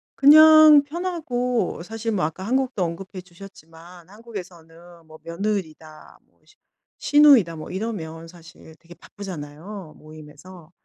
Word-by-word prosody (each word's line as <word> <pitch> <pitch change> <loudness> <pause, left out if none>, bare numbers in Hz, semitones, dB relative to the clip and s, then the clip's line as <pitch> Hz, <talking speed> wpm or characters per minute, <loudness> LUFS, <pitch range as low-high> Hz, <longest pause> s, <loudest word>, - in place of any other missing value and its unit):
그냥 310 0 +7
편하고 260 - -4
사실 225 +3 -6
뭐 185 -6 -1
아까 165 +4 -6
한국도 255 -3 -2
언급해 185 +3 -7
주셨지만 175 -1 -16
한국에서는 175 -6 -13
뭐 155 0 -16
며느리다. 165 -4 -6
뭐 - - -40
시누 420 - -26 0.4
시누이다. 275 - +4
뭐 155 - -10
이러면 165 -6 -6
사실 165 -1 -17
되게 170 +1 -16
바쁘잖아요. 175 0 -10
모임에서 155 +3 -15
185 Hz, 300 characters per minute, -22 LUFS, 165-230 Hz, 0.4 s, 그냥